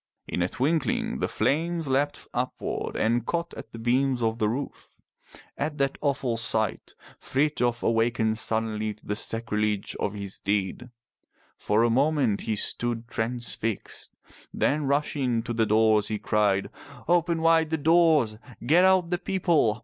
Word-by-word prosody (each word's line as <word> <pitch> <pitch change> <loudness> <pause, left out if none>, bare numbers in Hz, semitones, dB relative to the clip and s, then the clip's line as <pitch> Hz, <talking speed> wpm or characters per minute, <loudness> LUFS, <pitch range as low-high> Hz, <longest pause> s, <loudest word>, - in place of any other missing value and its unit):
In - - -2
a 90 - +1
twinkling 140 - 0
the - - 0
flames 165 +2 0
leapt 145 +2 -1
upward 125 +1 -3
and 115 +1 +1
caught 170 +5 -3
at - - -10
the - - -9
beams 125 +2 +1
of 115 0 0
the 105 - +2
roof. 135 +5 -6 0.6
At 150 +1 -2
that 140 -1 -1
awful 135 -5 0
sight, 110 -2 -1 0.2
Frithjof 130 -4 0
awakened 115 -1 +1
suddenly 110 -1 0
to 105 - -23
the 105 - -2
sacrilege 105 -2 -1
of 105 - -2
his 100 -2 -6
deed. 100 +4 -2 0.7
For 105 +2 +1
a 120 - +3
moment 135 -4 +2
he 110 - -2
stood 115 +2 -2
transfixed. 115 -2 -2 0.4
Then 150 +1 0
rushing 135 -4 0
to 120 0 -4
the 115 -1 +1
doors 110 -1 +4
he 110 - -2
cried, 105 -3 +1 0.4
"Open 170 -1 +2
wide 165 -1 +3
the 160 - 0
doors. 155 -8 +3 0.3
Get 165 +8 +5
out 185 -2 +4
the 175 - 0
people. 170 - +1
120 Hz, 150 wpm, -26 LUFS, 110-150 Hz, 0.7 s, Get